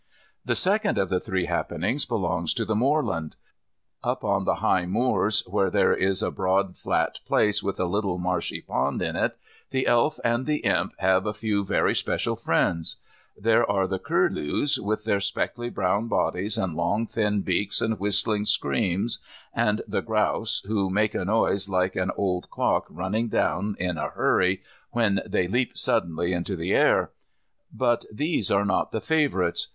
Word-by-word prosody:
The -, -, 0 dB
second 205 Hz, +2 st, +1 dB
of 95 Hz, -, +1 dB
the 90 Hz, -, +1 dB
three 95 Hz, -1 st, -2 dB
happenings -, -, -1 dB
belongs -, -, -1 dB
to -, -, -1 dB
the 110 Hz, -, -1 dB
moorland. 115 Hz, -, 0 dB, 0.7 s
Up -, -, -2 dB
on -, -, 0 dB
the -, -, +2 dB
high 90 Hz, -1 st, +1 dB
moors, 110 Hz, +1 st, +1 dB
where 100 Hz, +1 st, +1 dB
there -, -, +3 dB
is 95 Hz, +2 st, +1 dB
a -, -, 0 dB
broad 95 Hz, 0 st, 0 dB
flat -, -, -1 dB
place 105 Hz, 0 st, +2 dB
with 100 Hz, -, -3 dB
a 90 Hz, -, +1 dB
little 95 Hz, 0 st, -1 dB
marshy 90 Hz, 0 st, -2 dB
pond -, -, -1 dB
in -, -, -2 dB
it, -, -, 0 dB, 0.3 s
the 130 Hz, -1 st, 0 dB
Elf 120 Hz, +5 st, +2 dB
and 120 Hz, +3 st, 0 dB
the 150 Hz, -1 st, -1 dB
Imp 85 Hz, +3 st, +1 dB
have 95 Hz, +1 st, +2 dB
a 105 Hz, -, -2 dB
few 105 Hz, -2 st, -1 dB
very 95 Hz, -, +1 dB
special -, -, 0 dB
friends. 85 Hz, -2 st, 0 dB, 0.4 s
There 115 Hz, +2 st, +3 dB
are 100 Hz, -1 st, +2 dB
the 95 Hz, 0 st, -2 dB
curlews, 95 Hz, -, +1 dB
with 105 Hz, +1 st, -2 dB
their 100 Hz, -, +1 dB
speckly 120 Hz, +4 st, -2 dB
brown 100 Hz, +2 st, 0 dB
bodies 100 Hz, -1 st, 0 dB
and 95 Hz, -4 st, -1 dB
long 95 Hz, +7 st, 0 dB
thin 105 Hz, -3 st, 0 dB
beaks 95 Hz, +2 st, 0 dB
and 110 Hz, -1 st, -1 dB
whistling 105 Hz, +1 st, +2 dB
screams, 105 Hz, +1 st, +1 dB, 0.3 s
and 105 Hz, -2 st, +1 dB
the -, -, -1 dB
grouse 110 Hz, 0 st, 0 dB
who 100 Hz, -2 st, 0 dB
make 105 Hz, +3 st, +1 dB
a 90 Hz, -, -2 dB
noise 100 Hz, -1 st, +1 dB
like 95 Hz, 0 st, 0 dB
an 95 Hz, 0 st, 0 dB
old 90 Hz, -3 st, -1 dB
clock -, -, 0 dB
running 95 Hz, +7 st, -2 dB
down 100 Hz, +1 st, 0 dB
in 90 Hz, -2 st, -2 dB
a -, -, -2 dB
hurry 90 Hz, +1 st, +1 dB, 0.3 s
when 100 Hz, -5 st, +2 dB
they 90 Hz, -, 0 dB
leap 125 Hz, +6 st, -1 dB
suddenly 85 Hz, +2 st, +1 dB
into 90 Hz, +3 st, -2 dB
the 85 Hz, +2 st, -2 dB
air. -, -, +3 dB, 0.6 s
But 120 Hz, -1 st, 0 dB
these 130 Hz, -, -1 dB
are 100 Hz, +1 st, +2 dB
not 100 Hz, -, 0 dB
the 110 Hz, -, -2 dB
favourites. 145 Hz, -, +1 dB
100 Hz, 170 wpm, -25 LUFS, 95-110 Hz, 0.7 s, there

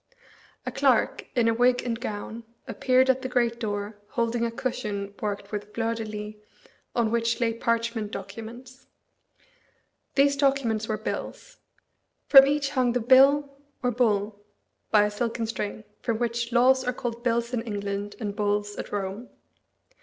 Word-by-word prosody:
A -, -, -3 dB
clerk, -, -, +2 dB
in 240 Hz, -2 st, +3 dB
a 230 Hz, -, +3 dB
wig 245 Hz, +2 st, +3 dB
and 230 Hz, -2 st, -2 dB
gown, 220 Hz, 0 st, -5 dB, 0.2 s
appeared 255 Hz, +2 st, +3 dB
at 260 Hz, 0 st, +2 dB
the 260 Hz, -, -4 dB
great 235 Hz, -2 st, +1 dB
door, 205 Hz, -1 st, -3 dB
holding 235 Hz, +1 st, -1 dB
a 235 Hz, -, +1 dB
cushion 210 Hz, -4 st, -4 dB
worked 205 Hz, -1 st, -3 dB
with 210 Hz, 0 st, -6 dB
fleurs 230 Hz, 0 st, -1 dB
de 225 Hz, -, -3 dB
lis, 210 Hz, 0 st, -6 dB, 0.6 s
on 230 Hz, -2 st, +1 dB
which 230 Hz, 0 st, +1 dB
lay 230 Hz, -2 st, +1 dB
parchment 230 Hz, -1 st, -1 dB
documents. 225 Hz, +6 st, -9 dB, 1.3 s
These 280 Hz, 0 st, +4 dB
documents 270 Hz, -6 st, +1 dB
were 215 Hz, -, -1 dB
bills. -, -, -6 dB, 0.7 s
From 270 Hz, -1 st, +9 dB
each 285 Hz, -1 st, 0 dB
hung 255 Hz, -4 st, +2 dB
the 245 Hz, -, +1 dB
bille, 275 Hz, +4 st, +5 dB, 0.3 s
or 250 Hz, -, +2 dB
bulle, 210 Hz, -3 st, +1 dB, 0.5 s
by 210 Hz, -1 st, +5 dB
a 210 Hz, -, -1 dB
silken 230 Hz, +2 st, -2 dB
string, 215 Hz, -1 st, -4 dB, 0.2 s
from 230 Hz, -2 st, -1 dB
which 235 Hz, 0 st, -2 dB
laws 260 Hz, +2 st, +4 dB
are 250 Hz, -, -1 dB
called 235 Hz, -1 st, -5 dB
bills 235 Hz, 0 st, 0 dB
in 240 Hz, -, 0 dB
England 205 Hz, -2 st, -4 dB
and 205 Hz, -3 st, -4 dB
bulls 205 Hz, 0 st, -1 dB
at -, -, -6 dB
Rome. 205 Hz, +4 st, -4 dB
230 Hz, 155 wpm, -26 LUFS, 210-250 Hz, 1.3 s, From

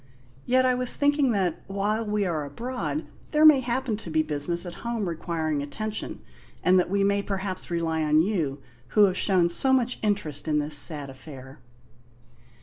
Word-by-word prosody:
Yet 255 Hz, +1 st, +3 dB
I 255 Hz, -, +3 dB
was 250 Hz, 0 st, +1 dB
thinking 285 Hz, -2 st, +2 dB
that, 185 Hz, -5 st, -1 dB
while 205 Hz, +3 st, -1 dB
we 210 Hz, -1 st, -1 dB
are 160 Hz, -4 st, -2 dB
abroad, 250 Hz, -, -4 dB, 0.2 s
there 305 Hz, 0 st, +3 dB
may 305 Hz, -3 st, +8 dB
happen 245 Hz, -2 st, -2 dB
to 205 Hz, -, -9 dB
be 155 Hz, 0 st, +1 dB
business 155 Hz, +4 st, +1 dB
at 175 Hz, -, -6 dB
home 235 Hz, -4 st, -2 dB
requiring 160 Hz, -3 st, -2 dB
attention, 215 Hz, +9 st, -5 dB, 0.4 s
and 185 Hz, +1 st, +5 dB
that 180 Hz, -, 0 dB
we 200 Hz, +1 st, +1 dB
may 200 Hz, 0 st, +2 dB
perhaps 195 Hz, -2 st, -4 dB
rely 165 Hz, -2 st, -1 dB
on 155 Hz, +1 st, +3 dB
you 160 Hz, -9 st, -2 dB, 0.4 s
who 210 Hz, -, +8 dB
have 185 Hz, -2 st, 0 dB
shown 185 Hz, -3 st, +2 dB
so 220 Hz, +10 st, +1 dB
much 250 Hz, -2 st, +1 dB
interest 160 Hz, -9 st, -2 dB
in 150 Hz, -1 st, +1 dB
this 150 Hz, 0 st, +2 dB
sad 145 Hz, -2 st, 0 dB
affair." 135 Hz, -1 st, -12 dB
190 Hz, 175 wpm, -26 LUFS, 155-225 Hz, 0.4 s, may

